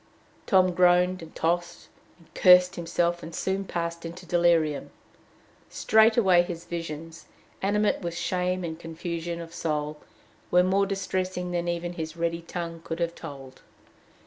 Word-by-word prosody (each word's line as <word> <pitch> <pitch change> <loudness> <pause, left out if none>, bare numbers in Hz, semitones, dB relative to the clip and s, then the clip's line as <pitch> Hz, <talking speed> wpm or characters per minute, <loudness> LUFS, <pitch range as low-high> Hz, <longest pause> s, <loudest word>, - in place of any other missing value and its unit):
Tom 185 -3 +4
groaned 180 +1 +3
and 165 - -12
tossed, 175 +1 -1 0.3
and 165 - -24
cursed 180 0 +6
himself, 170 0 -1
and 165 0 -8
soon 195 +1 -1
passed 170 -1 -4
into 170 +2 -8
delirium. 170 -4 +2 0.8
Straightway 220 -5 +4
his 175 -1 -6
visions, 165 -1 -7 0.3
animate 210 +2 +1
with 170 -2 -4
shame 180 0 -1
and 160 -1 -5
confusion 170 +1 -5
of 165 0 -9
soul, 150 -2 -2 0.5
were 180 0 +5
more 195 +2 +2
distressing 185 -2 -2
than 175 0 -2
even 175 0 -2
his 160 -1 -6
ready 170 0 -1
tongue 170 -1 -6
could 165 - -4
have 170 0 -1
told. 135 -5 -10
175 Hz, 140 wpm, -26 LUFS, 165-180 Hz, 0.8 s, cursed